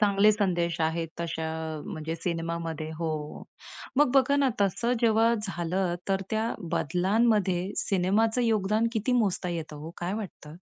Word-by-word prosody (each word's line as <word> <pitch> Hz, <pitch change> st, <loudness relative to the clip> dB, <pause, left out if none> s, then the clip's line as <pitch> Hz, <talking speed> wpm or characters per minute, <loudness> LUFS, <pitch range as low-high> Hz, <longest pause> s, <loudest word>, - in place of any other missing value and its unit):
चांगले 205 Hz, 0 st, +5 dB
संदेश 175 Hz, -5 st, 0 dB
आहेत 165 Hz, +1 st, 0 dB
तशा 165 Hz, -1 st, -3 dB, 0.3 s
अ, -, -, -7 dB
म्हणजे 160 Hz, +1 st, -4 dB
सिनेमामध्ये, 165 Hz, -2 st, -3 dB
हो. 155 Hz, -3 st, -4 dB, 0.5 s
मग 290 Hz, -2 st, +5 dB
बघा 270 Hz, +1 st, +4 dB
ना 280 Hz, -1 st, +3 dB
तसं 205 Hz, +5 st, +1 dB
जेव्हा 225 Hz, 0 st, +4 dB
झालं, 180 Hz, -1 st, -1 dB
तर 195 Hz, 0 st, +1 dB
त्या 220 Hz, +1 st, 0 dB, 0.2 s
बदलांमध्ये 190 Hz, +2 st, +2 dB
सिनेमाचं 210 Hz, +6 st, +2 dB
योगदान 215 Hz, 0 st, +2 dB
किती 225 Hz, +3 st, 0 dB
मोजता 205 Hz, -6 st, +1 dB
येतं 160 Hz, -3 st, -4 dB
हो. 155 Hz, +2 st, -7 dB
काय 175 Hz, +2 st, -2 dB
वाटतं? 175 Hz, -7 st, -7 dB
190 Hz, 140 wpm, -28 LUFS, 165-220 Hz, 0.5 s, चांगले